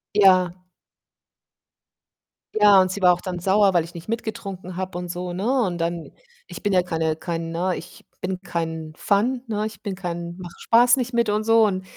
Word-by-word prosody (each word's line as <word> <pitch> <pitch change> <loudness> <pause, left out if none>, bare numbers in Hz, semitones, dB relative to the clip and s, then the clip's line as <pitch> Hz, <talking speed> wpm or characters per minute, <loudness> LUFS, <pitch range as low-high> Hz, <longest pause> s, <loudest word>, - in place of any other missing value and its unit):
Ja. 185 -3 +5 2.1
Ja, 205 -2 +7
und 185 - 0
sie 200 +1 -5
war 180 -1 +6
auch 175 - -5
dann 180 -2 -4
sauer, 195 +1 +3
weil 175 - +3
ich 170 +2 -12
nicht 170 - -9
mitgetrunken 200 -5 -5
habe 185 -1 -4
und 180 -1 -6
so, 180 0 -4
ne? 240 +8 +1
Und 175 -4 -2
dann 170 0 -3 0.4
ich - - -9
bin 205 - 0
ja 180 - +4
keine 160 -2 -1
kein 165 0 -4
ne, 180 +2 -1
ich 175 - -12 0.2
bin 185 0 -3
kein 160 -3 -4
Fun, 240 +6 +1
ne? 215 -1 -2
Ich 220 - -7
bin 200 -4 -4
kein 170 -2 -5
mache 175 -2 -9
Spaß 245 +2 +5
nicht 250 -1 -3
mit 235 -2 +2
und 210 +1 0
so. 225 -1 +5
Und 190 -2 -1
185 Hz, 195 wpm, -23 LUFS, 175-210 Hz, 2.1 s, Ja